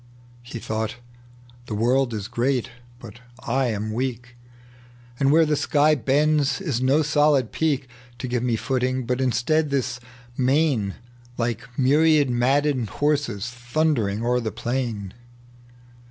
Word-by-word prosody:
He 120 0 -8
thought, 110 0 -3 0.7
"The 105 - -4
world 125 +4 +2
is 105 -2 -4
great, 125 +1 -1 0.3
but 120 - -12 0.2
I 130 +2 0
am 110 -1 -3
weak. 120 0 -4 0.8
And 135 0 +3
where 160 +2 +5
the 150 0 +1
sky 150 +1 +3
bends 145 - +1
is 150 -11 -2
no 135 +4 +3
solid 145 -4 +2
peak 145 -5 0 0.3
To 130 - -5
give 125 -1 -1
me 120 -2 0
footing, 130 +1 -1
but 125 +1 -1
ii^tead, 135 +5 +1
this 130 -3 -1 0.4
main 130 -6 +1 0.4
Like 120 0 -2
myriad 145 +1 +4
maddened 130 0 +1
horses 145 -7 -1
thundering 120 -4 -1
o'er 125 +1 +2
the 110 -3 -3
pkin. 120 -6 -3
130 Hz, 130 wpm, -23 LUFS, 120-145 Hz, 0.8 s, where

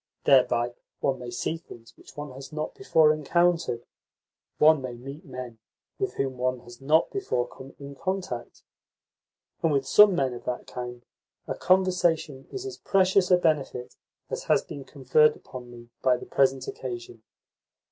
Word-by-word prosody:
Thereby 120 -3 +4 0.3
one 135 -2 0
may 125 -1 -7
see 140 +7 -2
things 115 -8 -14
which - - -17
one 145 -1 -6
has 135 +3 -10
not 155 0 -4
before 160 - +4
encountered, 165 -4 +1 0.7
one 155 -1 +6
may 130 -2 -5
meet 135 +7 -9
men 125 -4 -8 0.4
with 395 -1 -2
whom 130 -2 -2
one 130 0 0
has 120 +1 -14
not 155 +4 +3
before 380 - -1
come 135 +2 -12
in 140 0 -9
contact. 180 -7 -4 1.0
And 165 - +2
with 140 -2 +1
some 210 -3 +7
men 135 -5 +1
of 120 - -8
that 125 - -3
kind 125 -1 -7 0.4
a - - -1
conversation 175 -7 +1
is 395 0 -5
as 395 -2 -6
precious 190 -1 +3
a 180 - +6
benefit 145 -7 -1 0.4
as - - -4
has - - +3
been 140 -2 -9
conferred 140 +3 +3
upon 125 -1 -10
me 120 -1 -13
by 130 -1 +3
the - - -9
present 135 -1 +1
occasion. 120 -3 -6
135 Hz, 160 wpm, -27 LUFS, 125-165 Hz, 1.0 s, some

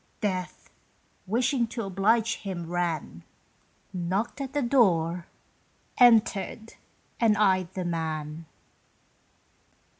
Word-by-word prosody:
Death, 185 -3 -3 0.6
wishing 240 +3 +1
to 230 0 -5
oblige 205 +4 +1
him, 185 -4 -5
ran, 165 - -3 0.7
Knocked 190 +9 -2
at 270 -1 -5
the 290 -1 0
door, 180 -9 +2 0.7
entered, 225 -2 +3 0.5
and 220 -3 +3
eyed 185 -4 +2
the 185 -2 -3
man. 160 -2 -4
195 Hz, 90 wpm, -27 LUFS, 170-230 Hz, 0.7 s, entered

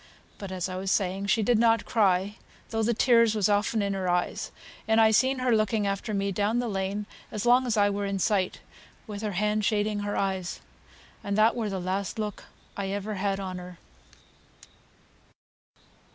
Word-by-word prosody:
But, 200 -2 -7
as 185 -1 -2
I 185 0 -5
was 190 +1 -3
saying, 195 0 0
she 215 +2 +2
did 235 +1 +3
not 230 -1 +3
cry, 200 -2 +1 0.3
though 225 0 0
the 225 +2 +2
tears 230 -2 +4
was 205 -3 +2
often 210 +1 +1
in 200 0 -1
her 190 -2 -2
eyes; 175 0 -1 0.4
and 220 0 +3
I 220 -1 +6
seen 260 +5 +3
her 255 -2 +2
looking 215 -1 +1
after 200 +3 -2
me 200 -1 -1
down 205 +4 0
the 245 0 0
lane 200 0 -2 0.3
as 215 0 -4
long 250 +1 +4
as 230 -2 0
I 205 -1 +5
were 200 0 -2
in 195 0 -2
sight, 190 -1 0 0.4
with 205 -1 -7
her 210 -2 -3
hand 210 +3 0
shading 210 0 0
her 205 0 -3
eyes 190 -2 -2 0.6
and 200 0 -2
that 220 +2 +4
were 225 -3 -2
the 195 -1 -3
last 190 +4 -3
look 210 -2 -4 0.3
I 200 -1 -3
ever 205 +2 -3
had 195 0 -1
on 185 -2 -5
her." 180 -1 -10
205 Hz, 190 wpm, -27 LUFS, 195-220 Hz, 0.6 s, I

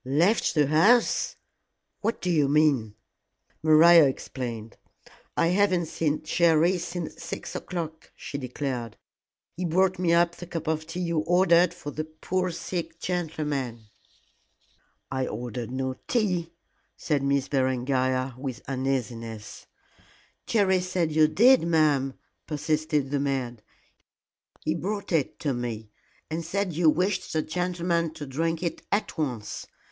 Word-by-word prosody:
"Left 165 - +2
the 150 -2 +4
house! 195 - +3 0.6
What 225 +2 -2
do 180 - 0
you 150 -4 +3
mean?" 140 -8 +2 0.7
Maria 160 +1 +7
explained. 120 -4 -5 0.6
"I 165 - +3
haven't 185 -2 +2
seen 155 -1 -1
Jerry 170 +2 +3
since 170 -1 -5
six - - -6
o'clock," 160 -3 -5
she 140 - -6
declared; 125 -3 -4 0.6
"he 180 - -4
brought 185 +2 +2
me 175 -2 +2
up 170 0 +3
the 175 - -9
cup 165 -2 -5
of 160 0 -1
tea 175 +2 -4
you 170 -2 0
ordered 175 +1 +4
for 175 -4 -8
the 155 +2 -4
poor 180 +4 -2
sick 165 -1 -5
gentleman." 145 - -3 1.2
"I 130 -1 -1
ordered 120 -1 -5
no 130 +1 -2
tea," 180 -8 0 0.5
said 150 -3 0
Miss 140 0 +1
Berengaria, 130 -1 0
with 130 -3 -6
uneasiness. 120 -5 -4 0.8
"Jerry 195 -4 +3
said 180 -3 -1
you 155 0 +5
did, 245 +11 +6
ma'am," 150 -5 +2 0.3
persisted 150 -2 -1
the 145 - +1
maid; 130 -5 -2 1.0
"he 155 - 0
brought 200 +5 -4
it 160 -5 0
to 145 -4 0
me, 115 -3 -5 0.4
and 160 +2 -3
said 185 +2 -2
you 165 0 +4
wished 185 +4 0
the 155 -1 +1
gentleman 170 -1 -1
to 150 -2 -6
drink 165 +5 -2
it 170 - -3
at 205 +2 0
once. 125 -9 -4
155 Hz, 130 wpm, -26 LUFS, 135-175 Hz, 1.2 s, Maria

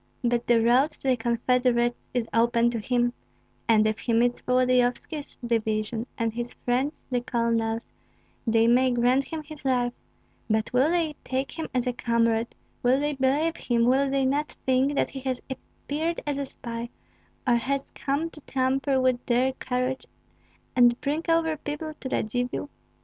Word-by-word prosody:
But 240 0 +1
the 235 -1 +5
road 245 +6 +4
to 270 - -4
the 255 - +4
confederates 240 +1 +1
is 245 -2 -1
open 235 +1 +3
to 235 - -2
him; 240 +2 +1 0.5
and 220 -2 +5
if 215 0 0
he 235 - -1
meets 240 +1 +2
Volodyovski's 255 +4 +1
division 220 0 -1
and 230 -2 -1
his 240 +1 -4
friends 260 +5 -1
the 245 -1 +1
colonels, 230 -1 0 0.6
they 225 0 +4
may 250 +2 +4
grant 250 +2 +2
him 320 -1 -5
his 300 -2 -11
life, 250 -2 +1 0.6
but 220 +2 0
will 260 +5 +4
they 330 -3 0
take 265 +1 -2
him 320 -1 -5
as 250 -1 0
a 250 - 0
comrade, 230 -1 +1 0.3
will 250 +2 +3
they 295 +1 0
believe 280 +5 +1
him, 235 -1 +1
will 270 +3 +3
they 270 0 +1
not 290 +3 0
think 265 +2 +2
that - - +1
he 270 - -6
has 260 -1 -2
appeared 305 +5 -4
as 290 -1 -1
a 280 - -3
spy, 235 -2 -6 0.6
or 240 -1 +5
has 275 +3 -2
come 290 +4 -2
to 305 - -13
tamper 265 +1 0
with 255 -1 +1
their 255 +2 +2
courage 255 0 -2 0.7
and 240 -1 +5
bring 295 +3 -1
over 325 -1 +2
people 300 +2 -5
to 260 - -5
Radzivill? 245 +5 -2
250 Hz, 165 wpm, -26 LUFS, 235-275 Hz, 0.7 s, the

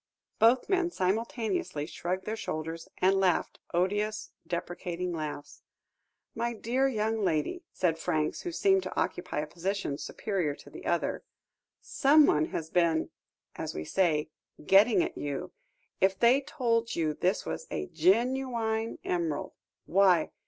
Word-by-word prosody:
Both 235 +3 +5
men 370 -3 +2
simultaneously 205 - -1
shrugged 180 +3 -4
their 220 - -2
shoulders 165 -5 -5
and 190 +1 +3
laughed, 185 -3 +1
odious, 205 +4 0 0.2
deprecating 175 0 -3
laughs. 150 -3 -6 0.7
"My 235 0 -2
dear 250 +5 +1
young 220 -3 0
lady," 180 - 0
said 165 -3 0
Franks, 155 -3 -1
who 350 - -4
seemed 385 +2 +3
to - - -4
occupy 150 - -2
a - - -3
position 175 -2 -3
superior 180 -9 -2
to - - -15
the - - -9
other, - - 0 0.6
"someone 280 - +4
has 160 0 -5
been, 170 -3 +2 0.4
as - - -5
we 80 - -4
say, 155 - +1 0.3
'getting 200 +1 +6
at' - - -5
you, 145 -2 -4 0.5
if 190 0 +3
they 240 +6 +5
told 230 -5 0
you 155 -2 0
this 185 +6 0
was - - -5
a - - -3
genuine 230 - +1
emerald. 165 -5 -2 0.3
Why! 185 -3 +4
190 Hz, 135 wpm, -29 LUFS, 165-230 Hz, 0.7 s, getting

